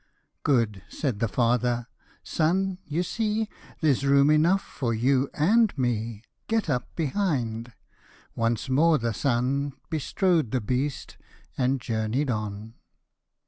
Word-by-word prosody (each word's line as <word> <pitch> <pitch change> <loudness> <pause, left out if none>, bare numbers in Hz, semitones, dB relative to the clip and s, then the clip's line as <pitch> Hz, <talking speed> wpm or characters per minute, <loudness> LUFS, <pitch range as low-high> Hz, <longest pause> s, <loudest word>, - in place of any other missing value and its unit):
" - - -51
Good," 110 -7 +1
said 130 -10 -2
the 115 - +1
father; 120 +1 +1 0.2
" - - -32
Son, 185 +4 0
you 160 +4 0
see 215 +3 -1 0.3
There's 145 -4 +2
room 140 +1 +5
enough 170 +6 +4
for 115 -4 -3
you 130 +4 +2
and 210 +6 +3
me; 115 -3 -1 0.2
Get 225 -8 0
up 125 -2 -3
behind." 130 - -1 0.6
Once 115 +2 0
more 155 +5 +4
the 115 -3 -1
son 135 +4 0 0.2
Bestrode 160 - +1
the 130 - 0
beast, 130 +5 -2 0.4
and 130 +1 +1
journey 115 +4 -1
'd 130 - -1
on. 105 0 -4
130 Hz, 135 wpm, -26 LUFS, 115-155 Hz, 0.6 s, room